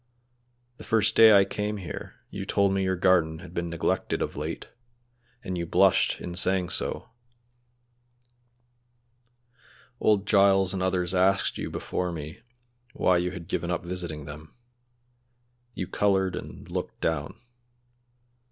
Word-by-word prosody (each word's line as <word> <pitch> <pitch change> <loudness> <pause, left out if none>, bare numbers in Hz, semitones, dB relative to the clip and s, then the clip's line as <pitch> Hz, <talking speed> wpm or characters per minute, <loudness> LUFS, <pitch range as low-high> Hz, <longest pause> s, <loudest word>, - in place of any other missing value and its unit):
The - - -11
first 110 -2 +2
day 110 -1 +8
I 100 - +5
came 105 +1 -3
here 95 -4 -7 0.2
you - - -5
told 100 -1 +1
me 95 - 0
your 95 0 0
garden 85 -3 +2
had 85 0 -12
been 85 -1 -3
neglected 85 -1 -1
of - - -5
late, 75 +3 -5 0.8
and 90 -1 -4
you 85 - -3
blushed 95 +3 +3
in 90 - -6
saying 90 0 +1
so. 120 - -2 2.9
Old 105 -2 +2
Giles 100 -2 +4
and 95 - -3
others 90 -1 0
asked 95 +1 +2
you - - -3
before 90 -1 -3
me 80 -1 -7 0.5
why 90 - +3
you 90 +1 0
had 90 -3 -8
given 85 +1 -2
up 90 - -2
visiting 85 -4 -4
them; 75 +1 -11 1.2
you 95 - -3
colored 95 0 +1
and - - -9
looked - - -4
down. 80 +6 -2
90 Hz, 135 wpm, -27 LUFS, 85-95 Hz, 2.9 s, day